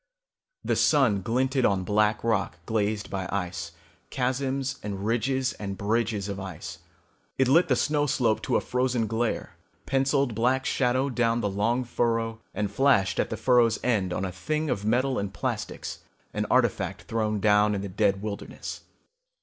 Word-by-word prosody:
The -, -, +1 dB
sun 130 Hz, -10 st, +3 dB
glinted 130 Hz, +5 st, 0 dB
on 95 Hz, -4 st, +2 dB
black 105 Hz, +2 st, +1 dB
rock 105 Hz, -7 st, 0 dB
glazed 105 Hz, -1 st, -1 dB
by 95 Hz, -1 st, -3 dB
ice, 90 Hz, -3 st, -3 dB, 0.4 s
chasms 135 Hz, +1 st, -1 dB
and 100 Hz, -1 st, -5 dB
ridges 125 Hz, +3 st, 0 dB
and 100 Hz, -2 st, -6 dB
bridges 105 Hz, -1 st, 0 dB
of 100 Hz, -1 st, -4 dB
ice. 95 Hz, -4 st, -7 dB, 0.6 s
It 130 Hz, -, +3 dB
lit 165 Hz, +7 st, +5 dB
the 130 Hz, -, +3 dB
snow 145 Hz, +3 st, +1 dB
slope 115 Hz, -5 st, +1 dB
to -, -, -1 dB
a -, -, +3 dB
frozen 125 Hz, -2 st, 0 dB
glare, 115 Hz, +2 st, -2 dB, 0.3 s
penciled 135 Hz, -1 st, +1 dB
black 125 Hz, +4 st, +1 dB
shadow 130 Hz, +1 st, +1 dB
down 115 Hz, -1 st, +1 dB
the 105 Hz, -, -1 dB
long 115 Hz, +6 st, +1 dB
furrow, 115 Hz, -1 st, -1 dB
and 105 Hz, -1 st, -2 dB
flashed 100 Hz, -7 st, +3 dB
at -, -, +1 dB
the -, -, -3 dB
furrow's 120 Hz, -3 st, +4 dB
end 100 Hz, -7 st, +1 dB
on 95 Hz, -, -1 dB
a 95 Hz, -, -3 dB
thing 150 Hz, -, -2 dB
of 100 Hz, -, -2 dB
metal 125 Hz, +5 st, +1 dB
and 100 Hz, -1 st, -4 dB
plastics, -, -, -4 dB, 0.3 s
an -, -, -1 dB
artifact -, -, +1 dB
thrown 110 Hz, -2 st, -1 dB
down 105 Hz, 0 st, +4 dB
in 100 Hz, -, -2 dB
the 100 Hz, -, -4 dB
dead 100 Hz, 0 st, +1 dB
wilderness. 105 Hz, -1 st, -6 dB
115 Hz, 165 wpm, -27 LUFS, 100-130 Hz, 0.6 s, lit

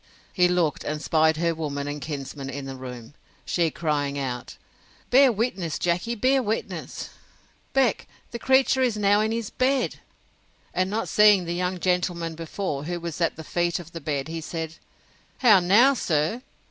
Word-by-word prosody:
He 180 Hz, -2 st, +4 dB
looked, 175 Hz, -4 st, 0 dB
and 150 Hz, +1 st, -3 dB
'spied 160 Hz, 0 st, +2 dB
her 170 Hz, +1 st, +1 dB
woman 145 Hz, -3 st, -4 dB
and 145 Hz, 0 st, -5 dB
kinsman 140 Hz, -2 st, -6 dB
in 140 Hz, +1 st, -6 dB
the 135 Hz, 0 st, -6 dB
room, 125 Hz, -1 st, -9 dB, 0.3 s
she 170 Hz, -2 st, +1 dB
crying 145 Hz, -3 st, -1 dB
out, 125 Hz, -3 st, -4 dB, 0.5 s
Bear 265 Hz, +1 st, +7 dB
witness, 195 Hz, -7 st, -2 dB
Jackey; 180 Hz, +7 st, -1 dB
bear 260 Hz, +4 st, +3 dB
witness, 220 Hz, -2 st, -4 dB, 0.6 s
Beck; 265 Hz, -5 st, +2 dB, 0.2 s
the 235 Hz, -, -5 dB
creature 265 Hz, +1 st, +3 dB
is 245 Hz, -4 st, +1 dB
now 205 Hz, 0 st, +3 dB
in 220 Hz, +1 st, 0 dB
his 230 Hz, -2 st, -3 dB
bed! 260 Hz, 0 st, +1 dB, 0.8 s
And 185 Hz, +1 st, 0 dB
not 220 Hz, +3 st, -2 dB
seeing 210 Hz, -3 st, +5 dB
the 170 Hz, -, -2 dB
young 180 Hz, +1 st, -2 dB
gentleman 175 Hz, -2 st, 0 dB
before, 160 Hz, -2 st, -4 dB
who 175 Hz, +1 st, -3 dB
was 170 Hz, 0 st, -6 dB
at 165 Hz, -, +1 dB
the 160 Hz, -, -8 dB
feet 175 Hz, +1 st, 0 dB
of 170 Hz, -1 st, -9 dB
the 165 Hz, -, -7 dB
bed, 140 Hz, -1 st, -2 dB
he 165 Hz, 0 st, -5 dB
said, 160 Hz, 0 st, -5 dB, 0.6 s
How 220 Hz, -6 st, +6 dB
now, 210 Hz, +10 st, +5 dB
sir? 165 Hz, -, 0 dB
170 Hz, 170 wpm, -25 LUFS, 155-210 Hz, 0.8 s, Bear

